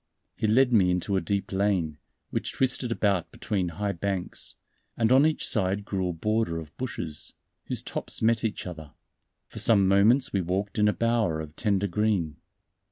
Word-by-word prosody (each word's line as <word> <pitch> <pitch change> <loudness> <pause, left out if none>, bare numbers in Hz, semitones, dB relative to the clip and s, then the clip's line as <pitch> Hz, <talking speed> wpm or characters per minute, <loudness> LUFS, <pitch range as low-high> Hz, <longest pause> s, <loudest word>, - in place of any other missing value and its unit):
He 110 - -1
led 125 +3 +4
me 95 -5 +5
into 90 +2 0
a 95 - +2
deep 100 +3 -2
lane, 95 -6 0 0.3
which - - -2
twisted 130 -2 0
about 100 -7 +1
between 95 -5 -2
high 100 +4 -2
banks; 95 0 -3 0.4
and 115 0 +2
on 135 +4 +6
each 160 - -1
side 100 -1 0
grew 95 -3 -1
a - - -2
border 105 0 0
of 80 0 -11
bushes, 85 -12 -4 0.3
whose - - -4
tops - - -3
met 115 0 +2
each 110 -3 -2
other. 80 -4 -8 0.5
For - - -7
some 100 -4 +5
moments 110 +8 +4
we 100 - +2
walked 95 +4 -2
in 105 - +4
a 105 - +3
bower 115 -8 +1
of 80 -1 -7
tender 100 -1 +1
green. 95 -6 0
100 Hz, 175 wpm, -27 LUFS, 90-110 Hz, 0.5 s, on